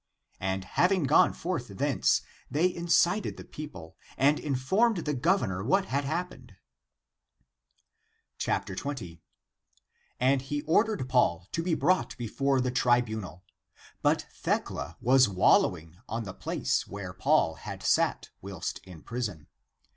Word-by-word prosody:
And 95 0 -2
having 180 - +2
gone 140 +2 +5
forth 165 -8 -4
thence, 135 +8 +1 0.3
they 175 +5 +1
incited 175 +3 +1
the - - -8
peo 155 0 -8
ple, 80 - -12 0.2
and 145 +3 +3
informed 185 - +1
the 150 - 0
governor 130 - +1
what 190 - +2
had 140 -2 -1
happened. 175 +5 -5 1.8
20. 105 - -3 1.0
And 130 +1 +3
he 145 +2 -4
ordered 190 - +1
Paul 90 -10 +2
to 165 - -1
be 170 -1 0
brought 185 -6 +1
before 135 +3 0
the 125 0 0
tribunal; 110 -7 0 0.6
but - - +2
Thecla 80 +6 -3
was 130 -1 +5
wallowing 85 -3 +2
on 115 +1 -2
the 95 -3 -7
place - - -1
where 95 -2 -7
Paul 80 - +2
had - - -8
sat - - +1
whilst 95 -3 -5
in 90 -4 -13
prison. 110 -11 -5
130 Hz, 125 wpm, -28 LUFS, 95-160 Hz, 1.8 s, gone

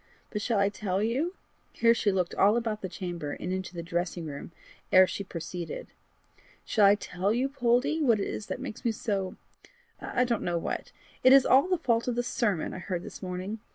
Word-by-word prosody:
"But 210 - -3
shall 225 +1 0
I 200 0 +3
tell 205 -1 -2
you" 280 - 0 0.4
here 230 0 +4
she 215 -3 +1
looked 185 -2 0
all 205 +4 +4
about 225 -3 -2
the 190 - -4
chamber 175 -4 -5
and 180 - -4
into 185 -1 -4
the 170 - -4
dressing 175 0 -2
room 145 +2 -7 0.4
ere 185 0 +8
she 200 - -4
proceeded 170 -2 -6 0.8
"shall 210 -3 +4
I 200 - +6
tell 195 -1 -2
you, 250 +4 +1
Poldie, 270 +3 +1
what 235 -7 +4
it 195 - -1
is 210 - -5
that - - -4
makes 255 -4 -7
me 235 - +2
so 200 -4 -2 0.6
I 250 - 0
don't 240 -3 0
know 175 -1 -1
what? 165 - -4 0.3
It 255 - +8
is 275 -1 +7
all 270 +6 +5
the 370 -1 +2
fault 235 -7 +1
of 245 - 0
the 245 - 0
sermon 210 -8 -1
I - - -6
heard 180 -1 -4
this - - -9
morning. 185 +3 -4
205 Hz, 210 wpm, -28 LUFS, 185-240 Hz, 0.8 s, ere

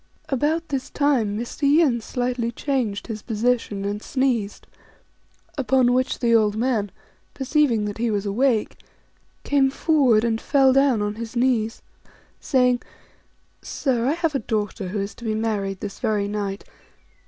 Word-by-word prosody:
About 310 +4 0
this 270 -2 -3
time 250 -8 +1
Mr. 235 +6 -6
Yin 285 -4 +3
slightly 245 0 -2
changed 240 -6 -2
his 220 -3 -6
position, 225 -3 -1
and 205 +1 -3
sneezed; 245 -7 -1 0.9
upon 255 -2 +3
which 255 +1 0
the 235 -2 +1
old 215 -2 +3
man, 225 -4 0 0.5
perceiving 265 -5 +1
that 205 +1 -5
he 235 0 +1
was 205 -1 -1
awake, 225 +2 +1 0.7
came 275 -2 +3
forward 265 -7 +3
and 225 -1 0
fell 270 -2 +4
down 270 -5 +3
on 205 0 -2
his 230 +1 -7
knees, 235 -2 0 0.6
saying, 250 -2 +2 0.5
" - - -41
Sir, 250 -4 -1
I 285 - +2
have 330 -2 -1
a 275 - 0
daughter 210 -3 -3
who 205 +3 -3
is 200 +1 -4
to - - -14
be 220 -2 -1
married 205 -3 -2
this 200 -1 -6
very 205 -2 0
night. 200 -1 -3
235 Hz, 155 wpm, -23 LUFS, 210-265 Hz, 0.9 s, fell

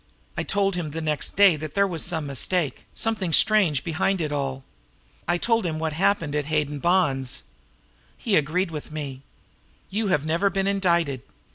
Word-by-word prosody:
I - - -1
told 200 -1 +1
him 175 -3 -3
the 160 +2 -5
next 155 -2 -1
day 195 -3 +6
there 155 +6 0
was 170 -5 -1
some 160 -4 +1
mistake, 145 +3 -1
something 215 -6 -1
strange 180 -7 +4
behind 185 +3 0
it 155 -3 -2
all. 135 -2 -3 0.6
I 175 +1 +2
told 230 +4 +1
him 165 -3 -2
what 160 -1 -2
happened 165 -3 +1
at 150 -1 -1
Hayden 150 -1 -1
Bond's. 145 -7 +1 0.7
He 215 -4 0
agreed 165 +4 +1
with 150 -1 -7
me. 140 -4 -6 0.7
You 210 +2 -1
have 150 -6 +1
never 170 +5 +1
been 195 -1 -1
indicted. 170 -9 +1
165 Hz, 165 wpm, -24 LUFS, 150-195 Hz, 0.7 s, day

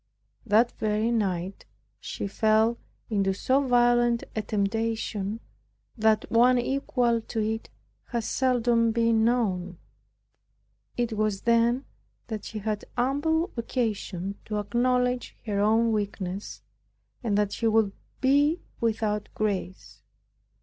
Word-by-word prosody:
That 225 +3 +4
very 215 +1 +1
night 190 -4 -2 0.3
she - - -5
fell 220 +3 +2 0.3
into 195 -2 +1
so 260 +7 +2
violent 240 -2 +3
a 215 - 0
temptation 215 0 -2 0.5
that 220 -1 +2
one 245 +2 +5
equal 245 -2 +1
to 225 - -5
it 220 +1 -2 0.4
has 235 -3 -3
seldom 240 -3 +2
been 230 -1 +2
known. 190 -7 0 1.2
It 240 -2 0
was 215 -2 0
then 235 +3 +2 0.6
she 220 - -7
had 210 0 -3
ample 320 +7 +1
occasion 205 -5 -3
to 210 - -3
acknowledge 250 +4 0
her 205 -3 -1
own 225 +3 +3
weakness, 200 -2 -4 0.6
and 210 -4 +1
what 205 -1 +1
she 230 - 0
would 220 -2 +3 0.3
be 290 +5 +3 0.2
without 215 -2 -1
grace. 195 -3 -3
225 Hz, 110 wpm, -27 LUFS, 210-240 Hz, 1.2 s, one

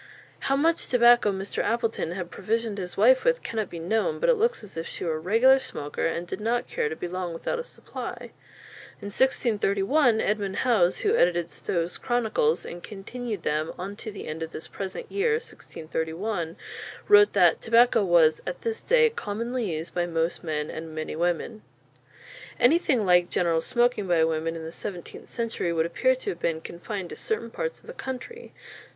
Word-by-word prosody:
How 275 - +4
much 325 +4 +2
tobacco 240 -3 +5
Mr. 195 +1 -3
Appleton 230 -7 -1
had 175 -2 -5
provisioned 220 +1 -2
his 180 -1 -6
wife 250 +6 +5
with - - +2
cannot 220 -4 -3
be 170 - -7
known, 205 +7 0
but - - +2
it - - +7
looks 465 - 0
as 200 - -10
if 165 0 -4
she - - -6
were 165 - 0
a - - -6
regular 230 +10 +5
smoker 145 - -3
and 170 +1 -3
did 175 - -6
not 240 +2 0
care 150 - -1
to 160 - -4
be 175 - -5
long 180 -1 -4
without 480 - -3
a - - -3
supply. - - -8 0.7
In 200 0 -7
1631 230 0 +2
Edmond 200 -3 -1
Howes, 215 -9 +2
who 420 +2 +2
edited 175 -1 +2
Stow's 170 0 -2
"Chronicles," 220 - +1
and 175 - -7
continued 210 +1 -6
them 155 +2 -1
"onto 200 +4 -6
the 200 - -8
end 155 +1 -5
of 160 0 -5
this - - -6
present 195 -1 -6
yeare 445 +3 +1
1631," 165 - -4 0.5
wrote 415 0 +7
that - - +4
tobacco 235 -1 +4
was 170 -4 +4
"at - - -4
this 455 -1 -3
day 470 -2 +4
commonly 230 - -3
used 160 +1 -5
by 175 -1 0
most 165 +1 -1
men 150 -2 -2
and 160 0 -7
many 155 0 -4
women." 175 +6 -1 1.0
Anything 265 - +3
like 180 -1 +4
general 165 -2 +1
smoking 240 -1 +1
by 170 -2 +3
women 160 0 0
in 165 - -6
the 160 - -6
seventeenth 180 -1 -7
century 230 -7 -2
would 165 -1 +1
appear 255 +10 +2
to 255 - -4
have 170 - -8
been 165 -1 -1
confined 175 +3 -6
to - - -6
certain 440 -2 -3
parts - - -4
of - - -22
the 485 - -8
country. 460 - -7
200 Hz, 185 wpm, -26 LUFS, 170-245 Hz, 1.0 s, it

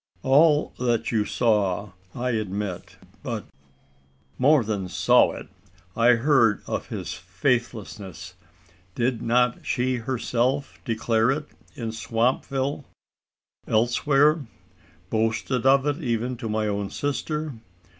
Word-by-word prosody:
"All 145 +3 +4
that 120 -2 0
you 110 -3 +1
saw, 105 -4 +1 0.2
I 125 +1 -1
admit, 105 -4 -4 0.2
but - - -4 0.5
" 65 +1 -36 0.3
"More 140 0 +5
than 100 -4 -3
saw - - +4
it: - - -9 0.5
I 120 +1 +5
heard 120 -3 +3
of - - -3
his - - -5
faithlessness. 110 - -3 0.6
Did 120 -1 0
not 125 +1 +1
she 125 +1 0
herself 125 +2 -1
declare 115 0 +1
it 150 +3 0 0.3
in 115 -5 -4
Swampville? 130 +5 -1 0.8
elsewhere! 140 +6 +2 0.6
boasted 115 +3 0
of 135 +1 +5
it 150 +3 -1
even 120 0 -1
to 115 -1 -5
my 110 0 0
own 100 -1 -2
sister! 150 +1 -3
120 Hz, 115 wpm, -25 LUFS, 110-135 Hz, 0.8 s, More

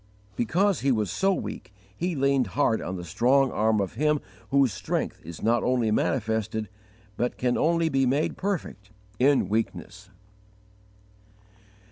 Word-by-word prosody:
Because 185 - +1
he 135 - +1
was 105 -5 0
so 195 0 +2
weak, 185 - -5 0.2
he 175 - -2
leaned 135 -3 +2
hard 110 - +2
on 90 - -4
the 90 - -6
strong 130 - +2
arm 110 0 +2
of 100 -2 -2
Him 150 +5 +1 0.3
whose 135 -5 +3
strength - - -3
is 85 0 -9
not 115 +2 +3
only 125 -4 +1
manifested, 110 -2 -1 0.5
but 120 - -1
can 125 -1 +1
only 165 +1 +2
be 135 -4 +2
made 140 +5 0
perfect, 175 - -4 0.3
in 135 -5 +4
weakness. 100 -2 -3
125 Hz, 140 wpm, -26 LUFS, 110-140 Hz, 0.5 s, in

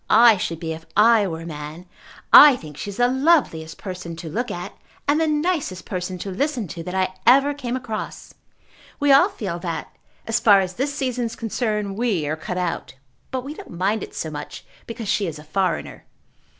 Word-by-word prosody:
I 230 0 +7
should 165 -3 -3
be 165 -1 -3
if 160 0 -9
I 215 -1 +5
were 165 -2 -5
a - - -8
man. 155 +2 -7 0.5
I 295 -3 +11
think 155 - -10
she 175 - -6
is 200 - -8
the 245 0 +4
loveliest 260 - +1
person 180 -3 -7
to 165 0 -7
look 240 +7 -2
at 175 -3 -6 0.3
and 295 +3 +3
the 320 - +2
nicest 300 - -1
person 185 0 -4
to 195 +2 -5
listen 255 +1 -1
to 165 +3 -6
that 180 +3 -6
I 185 0 0
ever 275 +4 +6
came 255 -4 -4
across. 245 -4 -6 0.7
We 285 -1 +3
all 280 +8 +6
feel 190 - -5
that, 170 -2 -5 0.3
as 225 +1 +1
far 210 -4 +6
as 185 -1 -2
this 270 +8 -1
season 255 -4 -2
is 225 - -5
concerned, 210 -3 -2
we 210 -10 0
are 150 +2 -1
cut 180 +3 -5
out. 175 -6 -3 0.3
But 260 -1 -3
we 280 +3 -6
don't - - -11
mind 200 +4 0
it - - -8
so 160 - -4
much 150 -1 -8 0.2
because 230 -2 -6
she 195 0 +1
is 160 -2 -5
a 150 - -11
foreigner." 185 +4 -2
205 Hz, 205 wpm, -22 LUFS, 175-250 Hz, 0.7 s, I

